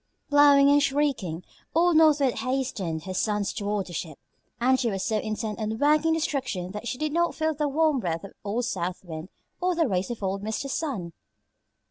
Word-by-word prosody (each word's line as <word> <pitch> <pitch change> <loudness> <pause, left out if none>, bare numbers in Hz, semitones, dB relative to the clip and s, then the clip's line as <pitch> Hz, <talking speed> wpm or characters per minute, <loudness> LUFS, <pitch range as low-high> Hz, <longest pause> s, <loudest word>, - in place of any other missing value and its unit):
Blowing 285 -1 +7
and 290 0 +5
shrieking, 275 - 0 0.3
old 345 +1 +4
North 310 -2 +5
Wind 260 -3 +1
hastened 240 -12 -2
her 185 +1 -5
sons 205 +1 0
toward 205 -3 -2
the 175 - -10
ship, 160 -3 -5 0.4
and 260 +2 +3
she 240 -2 +1
was 195 -2 -2
so 215 -1 0
intent 215 0 -4
on 220 0 -2
working 305 +4 +3
destruction 265 - -2
that 210 +4 -6
she 250 - -3
did 305 +1 -2
not 340 +1 +1
feel 315 0 0
the 300 0 -1
warm 305 0 +2
breath 165 -6 -2
of 200 - -10
old 220 +4 -1
South 185 -3 -3
Wind 160 +1 -7 0.3
or 360 0 +1
the 330 -3 +2
rays 185 -3 -1
of 235 -4 -5
old 195 +1 -1
Mr. 220 +6 -3
Sun. 255 - -3
240 Hz, 195 wpm, -26 LUFS, 195-290 Hz, 0.4 s, Blowing